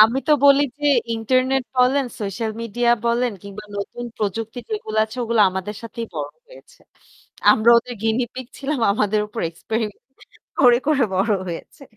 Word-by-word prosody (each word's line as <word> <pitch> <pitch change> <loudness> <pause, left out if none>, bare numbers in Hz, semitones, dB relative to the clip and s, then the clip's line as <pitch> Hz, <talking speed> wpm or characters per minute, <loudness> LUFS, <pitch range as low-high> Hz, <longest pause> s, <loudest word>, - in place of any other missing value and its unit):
আমি 225 +5 +6
তো - - +6
বলি 280 0 +7 0.2
যে 295 - -6 0.3
ইন্টারনেট 255 +4 +1
বলেন, 260 +2 +3 0.2
সোশ্যাল 215 +3 -3
মিডিয়া 235 +2 0
বলেন 235 0 +1
কিংবা 200 +1 -9
নতুন 220 +4 -5
প্রযুক্তি 220 +3 -3
যেগুলো 320 - -4
আছে 220 +3 -11
ওগুলো 230 -1 +1
আমাদের 190 +3 -4
সাথেই 230 0 -6
বড় - - -3 0.2
হয়েছে। - - -17 0.7
আমরা 225 +2 +4
ওদের 245 +1 -7
গিনিপিগ 240 +2 -1
ছিলাম 275 -2 -2
আমাদের 210 0 +1
উপর 225 - -6
এক্সপেরিমেন্ট 220 +6 -4 0.6
করে, 245 -2 +7
করে 290 -4 +3
বড় 200 +4 +1 0.2
হয়েছে। 175 - -8
230 Hz, 150 wpm, -21 LUFS, 215-255 Hz, 0.7 s, বলি